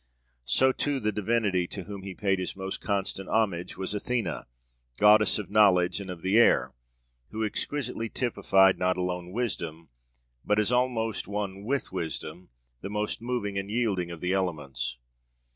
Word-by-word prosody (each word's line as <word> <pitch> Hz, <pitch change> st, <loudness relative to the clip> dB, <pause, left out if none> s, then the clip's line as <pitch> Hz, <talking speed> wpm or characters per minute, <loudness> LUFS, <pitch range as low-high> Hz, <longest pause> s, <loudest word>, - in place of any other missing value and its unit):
So 130 Hz, 0 st, +4 dB
too, 140 Hz, +1 st, -1 dB
that 105 Hz, 0 st, +1 dB
divinity 105 Hz, -3 st, +1 dB
to 95 Hz, -, -6 dB
whom 100 Hz, +1 st, -8 dB
he 95 Hz, -1 st, -7 dB
paid 95 Hz, -1 st, 0 dB
his 90 Hz, -, -3 dB
most 95 Hz, 0 st, -4 dB
constant 95 Hz, -1 st, -2 dB
homage 100 Hz, -6 st, 0 dB
was 95 Hz, +1 st, -2 dB
Athena, 120 Hz, +3 st, -2 dB, 0.5 s
goddess 105 Hz, 0 st, +6 dB
of 105 Hz, -2 st, -6 dB
knowledge 95 Hz, -3 st, +4 dB
and 95 Hz, -, -8 dB
of 90 Hz, -2 st, -7 dB
the 95 Hz, +4 st, +4 dB
air, 120 Hz, -, +4 dB, 0.6 s
who 110 Hz, 0 st, -2 dB
exquisitely 125 Hz, 0 st, -2 dB
typified, 95 Hz, -6 st, +3 dB
not 90 Hz, 0 st, +1 dB
alone 90 Hz, -1 st, -3 dB
wisdom, 85 Hz, -8 st, -3 dB, 0.5 s
but, 105 Hz, -, +1 dB
as 105 Hz, +2 st, +2 dB
almost 125 Hz, -3 st, 0 dB
one 100 Hz, -1 st, -4 dB
with 140 Hz, +4 st, -1 dB
wisdom, 85 Hz, +2 st, -5 dB, 0.3 s
the 100 Hz, -, -5 dB
most 105 Hz, +1 st, -2 dB
moving 115 Hz, -5 st, -2 dB
and 95 Hz, +1 st, -6 dB
yielding 105 Hz, -6 st, 0 dB
of 85 Hz, -2 st, -8 dB
the 90 Hz, +1 st, 0 dB
elements. 75 Hz, -10 st, -2 dB
100 Hz, 160 wpm, -28 LUFS, 90-110 Hz, 0.6 s, goddess